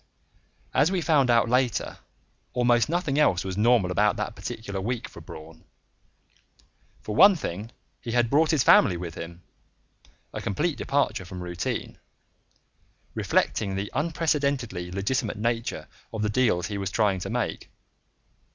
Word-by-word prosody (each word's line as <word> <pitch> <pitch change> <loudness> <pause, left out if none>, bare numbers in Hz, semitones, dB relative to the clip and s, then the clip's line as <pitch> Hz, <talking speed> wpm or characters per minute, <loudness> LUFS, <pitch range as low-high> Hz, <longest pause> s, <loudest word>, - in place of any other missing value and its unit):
As 145 +7 +3
we 190 - +1
found 150 -6 +3
out 120 -1 +4
later, 125 -2 0 0.5
almost 120 0 +3
nothing 165 -4 0
else 95 - +3
was 95 -1 -3
normal 105 -3 +3
about 105 +3 +2
that - - -4
particular 100 -3 -5
week 120 +4 -3
end - - -13
for - - -10
Braun. 80 +1 -12 1.4
For 105 - -4
one 200 - +8
thing, 105 - -5 0.3
he 115 - -5
had 120 -1 +3
brought 155 +6 +3
his 155 -5 +3
family 90 - +6
with 85 -1 -6
him 85 +2 -9 0.9
a - - -4
complete 145 - -1
departure 140 -8 0
from 90 -1 -8
routine 85 -1 -4 1.1
reflecting 95 -2 0
the 100 +1 -4
unprecedentedly 140 - -1
legitimate 105 +5 -2
nature 115 +1 -2 0.2
of 110 -1 -3
the 105 - +1
deals 105 -6 +2
he 100 -2 -4
was 95 -2 -2
trying 100 -4 +1
to - - -5
make. - - -3
115 Hz, 145 wpm, -26 LUFS, 95-135 Hz, 1.4 s, one